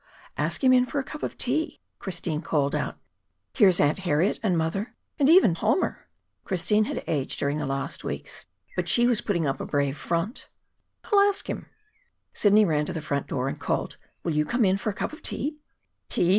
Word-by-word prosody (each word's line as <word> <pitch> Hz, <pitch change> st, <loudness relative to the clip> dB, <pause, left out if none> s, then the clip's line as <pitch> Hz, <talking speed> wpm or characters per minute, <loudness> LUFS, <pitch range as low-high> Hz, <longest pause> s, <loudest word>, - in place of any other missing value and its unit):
"Ask -, -, -1 dB
him 255 Hz, -1 st, +6 dB
in 250 Hz, 0 st, +4 dB
for 290 Hz, -, -4 dB
a 275 Hz, -, +1 dB
cup 300 Hz, +3 st, -9 dB
of -, -, -4 dB
tea," 300 Hz, +6 st, -1 dB, 0.2 s
Christine 170 Hz, -5 st, -3 dB
called 145 Hz, -4 st, 0 dB
out. -, -, -2 dB, 0.6 s
"Here's 195 Hz, -8 st, +5 dB
Aunt 145 Hz, +5 st, +3 dB
Harriet 175 Hz, 0 st, +1 dB
and 190 Hz, -6 st, +1 dB
mother 165 Hz, +7 st, -2 dB, 0.2 s
and 280 Hz, 0 st, +4 dB
even 330 Hz, -, +7 dB
Palmer!" 220 Hz, -, 0 dB, 0.4 s
Christine 210 Hz, +3 st, +2 dB
had -, -, -4 dB
aged 140 Hz, -4 st, -2 dB
during 140 Hz, +2 st, 0 dB
the 150 Hz, -, -2 dB
last 135 Hz, 0 st, -3 dB
weeks, -, -, -6 dB, 0.3 s
but -, -, -1 dB
she 240 Hz, -1 st, +4 dB
was 240 Hz, -3 st, +3 dB
putting 170 Hz, -6 st, 0 dB
up 135 Hz, 0 st, -1 dB
a -, -, -3 dB
brave 140 Hz, -1 st, 0 dB
front. 170 Hz, -, -2 dB, 0.5 s
"I'll 410 Hz, -, +3 dB
ask 400 Hz, 0 st, +2 dB
him." -, -, -5 dB, 0.7 s
Sidney 210 Hz, +1 st, +5 dB
ran 150 Hz, -4 st, +1 dB
to -, -, -3 dB
the 165 Hz, -, -3 dB
front 140 Hz, -2 st, -2 dB
door 130 Hz, -1 st, -2 dB
and -, -, -4 dB
called: -, -, -2 dB, 0.3 s
"Will 165 Hz, -, -1 dB
you 150 Hz, 0 st, +2 dB
come 235 Hz, +9 st, +1 dB
in 190 Hz, 0 st, +3 dB
for 210 Hz, -, -2 dB
a -, -, -2 dB
cup -, -, -3 dB
of 310 Hz, -, -10 dB
tea?" 300 Hz, 0 st, -2 dB, 0.5 s
"Tea! 175 Hz, -, +2 dB
190 Hz, 200 wpm, -26 LUFS, 150-245 Hz, 0.7 s, even